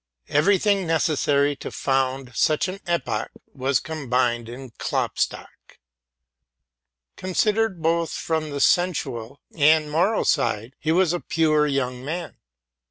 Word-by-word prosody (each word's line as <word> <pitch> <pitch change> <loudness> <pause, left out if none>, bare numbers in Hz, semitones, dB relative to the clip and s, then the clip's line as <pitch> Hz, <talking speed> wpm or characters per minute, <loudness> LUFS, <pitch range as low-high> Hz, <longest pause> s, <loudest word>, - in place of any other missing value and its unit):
Every 160 +8 +4
thing 200 -2 +1
requisite 145 -3 +1
for - - -5
founding 135 -1 -1
such 155 +8 +2
an 185 +2 -6
epoch 170 -1 -1 0.2
was 135 0 +1
combined 125 -6 -1
in 125 +1 -9
Klopstock. - - -3 1.4
Considered, 205 0 0
both 165 0 +1
from 160 -1 -2
the 140 -1 -4
sensual 140 -9 0
and 155 0 +4
moral 180 +8 +1
side, 120 -4 0
he 160 - 0
was 175 0 +3
a 175 - -1
pure 155 -3 +2
young 130 -3 -2
man. 165 +3 -5
155 Hz, 120 wpm, -23 LUFS, 135-170 Hz, 1.4 s, Every